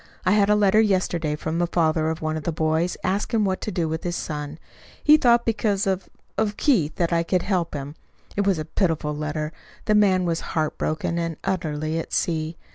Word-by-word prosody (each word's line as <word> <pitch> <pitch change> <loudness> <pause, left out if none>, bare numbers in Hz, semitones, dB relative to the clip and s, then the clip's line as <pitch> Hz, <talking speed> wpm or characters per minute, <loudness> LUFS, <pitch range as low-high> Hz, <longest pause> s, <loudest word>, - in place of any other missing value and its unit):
I 185 - +4
had 205 0 +4
a 210 - +5
letter 210 +1 +4
yesterday 180 -7 +1
from 160 +2 -3
the 175 - +2
father 160 -2 +1
of 160 0 -4
one 155 0 -1
of 155 - -3
the 170 - -1
boys, 160 +2 0
asking 205 +3 0
what 190 -2 -1
to 215 - -3
do 170 -5 -1
with 160 +1 -3
his 175 -1 -2
son. 150 -2 -4 0.5
He 300 - +8
thought 240 -5 +4
because 215 -2 +1
of 190 -1 -1 0.3
of 210 -1 0
Keith, 185 - +2
that 170 -1 0
I 170 - +3
could 180 +1 0
help 180 -5 -1
him. 140 0 -5 0.4
It 200 0 0
was 195 -3 +3
a 155 - -3
pitiful 160 -4 -1
letter. 150 +1 -3 0.3
The 215 - +2
man 190 -3 +4
was 165 -1 0 0.2
heart 155 -1 0
broken 165 +2 -1
and 165 -2 -3
utterly 160 -4 -2
at - - -7
sea. 160 -1 -1
170 Hz, 210 wpm, -24 LUFS, 155-200 Hz, 0.5 s, He